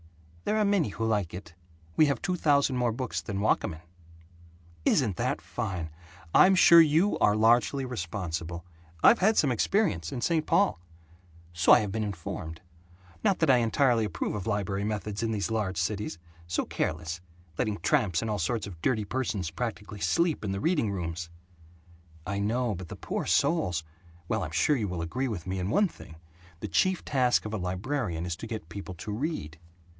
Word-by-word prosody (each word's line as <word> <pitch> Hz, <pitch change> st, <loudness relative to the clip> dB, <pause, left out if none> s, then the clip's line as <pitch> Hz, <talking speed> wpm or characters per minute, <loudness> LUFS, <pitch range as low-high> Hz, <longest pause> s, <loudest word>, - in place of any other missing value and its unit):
"There 215 Hz, -, +1 dB
are 215 Hz, -, +3 dB
many 200 Hz, -, +2 dB
who 115 Hz, +3 st, -3 dB
like 105 Hz, -6 st, 0 dB
it. 90 Hz, -3 st, -9 dB, 0.4 s
We 155 Hz, -, +5 dB
have 140 Hz, -4 st, -1 dB
two 185 Hz, -, 0 dB
thousand 140 Hz, -5 st, +2 dB
more 125 Hz, -2 st, +1 dB
books 110 Hz, -, -3 dB
than 95 Hz, +4 st, -4 dB
Wakamin." 90 Hz, -5 st, 0 dB, 1.0 s
"Isn't 110 Hz, -, +2 dB
that -, -, -1 dB
fine. 85 Hz, -5 st, -4 dB, 0.4 s
I'm 190 Hz, +1 st, +7 dB
sure 170 Hz, -2 st, +8 dB
you 165 Hz, +6 st, +3 dB
are 105 Hz, -, +4 dB
largely 120 Hz, +5 st, +3 dB
responsible. 85 Hz, -6 st, -4 dB, 0.4 s
I've 235 Hz, -, +7 dB
had 215 Hz, +4 st, +3 dB
some 140 Hz, -, +4 dB
experience, 115 Hz, -, +1 dB
in -, -, -4 dB
St. 160 Hz, +2 st, +1 dB
Paul." 200 Hz, -, +3 dB, 0.7 s
"So 85 Hz, +1 st, +3 dB
I -, -, +8 dB
have 105 Hz, -2 st, -3 dB
been 110 Hz, +2 st, -2 dB
informed. 85 Hz, -4 st, -6 dB, 0.6 s
Not 195 Hz, -, +3 dB
that 160 Hz, -4 st, +4 dB
I 130 Hz, -, +6 dB
entirely 120 Hz, 0 st, +2 dB
approve 105 Hz, -, -2 dB
of 105 Hz, -1 st, -4 dB
library 100 Hz, -2 st, -1 dB
methods 105 Hz, 0 st, -3 dB
in 115 Hz, -1 st, 0 dB
these 105 Hz, 0 st, -2 dB
large 105 Hz, -5 st, -1 dB
cities. 100 Hz, +2 st, -2 dB, 0.3 s
So 85 Hz, -, -1 dB
careless, 80 Hz, +2 st, -3 dB, 0.4 s
letting 105 Hz, -2 st, 0 dB
tramps 105 Hz, -, +1 dB
and 115 Hz, -, -3 dB
all 105 Hz, -1 st, -1 dB
sorts 110 Hz, +6 st, -1 dB
of 90 Hz, -5 st, -10 dB
dirty 110 Hz, -1 st, +1 dB
persons 105 Hz, -8 st, -2 dB
practically 105 Hz, +1 st, -5 dB
sleep 150 Hz, -, +1 dB
in 100 Hz, -, -2 dB
the 95 Hz, -, -2 dB
reading 150 Hz, -, +1 dB
rooms." 85 Hz, -2 st, -4 dB, 1.0 s
"I 100 Hz, 0 st, -2 dB
know, 115 Hz, +3 st, 0 dB
but 90 Hz, -1 st, -7 dB
the -, -, -6 dB
poor -, -, -4 dB
souls 140 Hz, -, +1 dB, 0.4 s
Well, -, -, 0 dB
I'm 75 Hz, -, -5 dB
sure 85 Hz, -, +2 dB
you 110 Hz, -6 st, -1 dB
will 90 Hz, -3 st, -3 dB
agree 130 Hz, +11 st, -2 dB
with 100 Hz, -9 st, -5 dB
me 95 Hz, 0 st, -3 dB
in 90 Hz, +1 st, -2 dB
one 205 Hz, -, +3 dB
thing: 80 Hz, -, -13 dB, 0.4 s
The -, -, -4 dB
chief 185 Hz, -1 st, +1 dB
task 125 Hz, -4 st, +2 dB
of 105 Hz, -, -5 dB
a -, -, -1 dB
librarian 90 Hz, -, -2 dB
is 85 Hz, -2 st, -3 dB
to 115 Hz, -, -7 dB
get 110 Hz, -7 st, -6 dB
people 95 Hz, 0 st, -7 dB
to 105 Hz, +5 st, -6 dB
read." 105 Hz, -, -4 dB
105 Hz, 185 wpm, -28 LUFS, 90-130 Hz, 1.0 s, sure